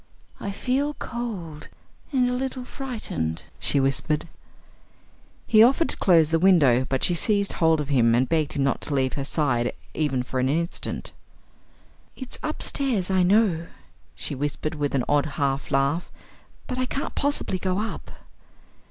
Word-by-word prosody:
"I 200 Hz, -, -4 dB
feel 270 Hz, +8 st, -1 dB
cold 190 Hz, -11 st, -6 dB, 0.4 s
and 255 Hz, -3 st, +2 dB
a 250 Hz, -, 0 dB
little 255 Hz, 0 st, -3 dB
frightened," 215 Hz, -, -4 dB, 0.2 s
she 140 Hz, -, +1 dB
whispered. 135 Hz, +4 st, 0 dB, 1.2 s
He 215 Hz, -1 st, +5 dB
offered 270 Hz, +8 st, +5 dB
to -, -, -3 dB
close 165 Hz, -4 st, +4 dB
the 165 Hz, -, +3 dB
window, 145 Hz, -9 st, +4 dB
but 135 Hz, -1 st, -1 dB
she 175 Hz, -, +4 dB
seized 200 Hz, +3 st, +1 dB
hold 160 Hz, -1 st, +3 dB
of 150 Hz, -1 st, -3 dB
him 115 Hz, -5 st, +4 dB
and 125 Hz, +2 st, +2 dB
begged 155 Hz, -1 st, 0 dB
him 140 Hz, -, 0 dB
not 135 Hz, -, 0 dB
to 145 Hz, -, -2 dB
leave 130 Hz, -2 st, +1 dB
her 140 Hz, -, -3 dB
side 135 Hz, -5 st, 0 dB, 0.2 s
even 135 Hz, -5 st, 0 dB
for 130 Hz, +1 st, -3 dB
an 130 Hz, +1 st, +1 dB
instant. 170 Hz, +4 st, -2 dB, 1.0 s
"It's 260 Hz, -2 st, -6 dB
upstairs, 265 Hz, -, -1 dB
I 190 Hz, -1 st, +3 dB
know," 180 Hz, -3 st, +3 dB, 0.5 s
she -, -, -4 dB
whispered, 145 Hz, +2 st, -3 dB
with 145 Hz, -2 st, -2 dB
an 130 Hz, -, +1 dB
odd 145 Hz, +1 st, +2 dB
half 140 Hz, -1 st, -1 dB
laugh; 140 Hz, +5 st, 0 dB, 0.5 s
"but 255 Hz, -1 st, -4 dB
I 255 Hz, -, 0 dB
can't 275 Hz, -, -3 dB
possibly 285 Hz, -9 st, -1 dB
go 185 Hz, 0 st, -1 dB
up." 215 Hz, +2 st, -4 dB
165 Hz, 160 wpm, -25 LUFS, 140-225 Hz, 1.2 s, He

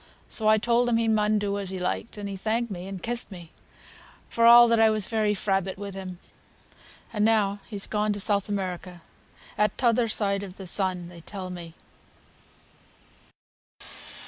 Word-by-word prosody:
So 220 Hz, -, 0 dB
I 215 Hz, 0 st, +6 dB
telled 240 Hz, +2 st, +2 dB
him 230 Hz, -, +2 dB
he 230 Hz, 0 st, +1 dB
mun 215 Hz, -1 st, +2 dB
do 205 Hz, -1 st, -1 dB
as 195 Hz, -2 st, -3 dB
he 190 Hz, -, -4 dB
liked; 185 Hz, +5 st, -3 dB
and 205 Hz, -1 st, -5 dB
he 200 Hz, -, -5 dB
thanked 220 Hz, +4 st, -1 dB
me 180 Hz, -1 st, -6 dB
and 195 Hz, -2 st, -7 dB
kissed 240 Hz, -1 st, +1 dB
me, 175 Hz, -3 st, -11 dB, 0.8 s
for 230 Hz, 0 st, +3 dB
all 235 Hz, 0 st, +8 dB
I 220 Hz, -, +6 dB
was 215 Hz, -2 st, 0 dB
very 215 Hz, -1 st, 0 dB
frabbit 195 Hz, -1 st, -1 dB
with 200 Hz, 0 st, -7 dB
him; 185 Hz, -2 st, -7 dB, 1.0 s
and 210 Hz, -2 st, 0 dB
now 210 Hz, -2 st, +2 dB
he's 205 Hz, -3 st, -4 dB
gone 210 Hz, 0 st, 0 dB
to 205 Hz, -, -5 dB
South 200 Hz, 0 st, 0 dB
America, 180 Hz, -3 st, -4 dB, 0.6 s
at 210 Hz, 0 st, +1 dB
t'other 235 Hz, -1 st, +2 dB
side 200 Hz, -2 st, -1 dB
of 190 Hz, -2 st, -8 dB
the 195 Hz, -, -9 dB
sun, 185 Hz, -1 st, -1 dB
they 175 Hz, -1 st, -12 dB
tell 185 Hz, +1 st, -7 dB
me." 170 Hz, -2 st, -9 dB
205 Hz, 170 wpm, -26 LUFS, 190-220 Hz, 1.0 s, all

